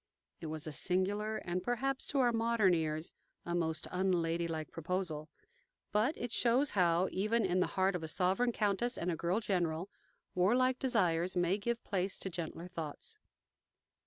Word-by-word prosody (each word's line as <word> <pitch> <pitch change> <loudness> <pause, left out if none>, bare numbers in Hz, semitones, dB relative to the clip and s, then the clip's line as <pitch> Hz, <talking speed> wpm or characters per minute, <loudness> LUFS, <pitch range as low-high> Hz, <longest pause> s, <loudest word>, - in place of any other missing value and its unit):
'" - - -44
It 165 - -5
was 155 +1 -4
a 155 - -4
singular, 200 +7 0
and 180 +1 -3
perhaps, 260 +6 -1
to 285 - -1
our 245 -1 +4
modern 225 -4 +3
ears, 155 -1 -1 0.3
a 175 - -2
most 160 -2 0
unladylike 170 -3 0
proposal; 165 -2 -3 0.6
but 225 +9 +2
it 240 -1 -4
shows 250 +5 +3
how, 180 -2 +3
even 215 +3 +1
in 185 0 +1
the 180 - +2
heart 190 0 +3
of 180 - -3
a 160 - -4
sovereign 190 +9 +1
countess 220 +3 0
and 175 +1 -1
a - - -1
girl 175 +6 0
general, 180 -3 -1 0.4
warlike 250 +8 +3
desires 185 -9 +1
may 180 +3 +2
give 235 +3 -2
place 190 -1 -1
to 190 - -4
gentler 170 0 -5
thoughts. 175 - -7
185 Hz, 165 wpm, -34 LUFS, 170-225 Hz, 0.6 s, our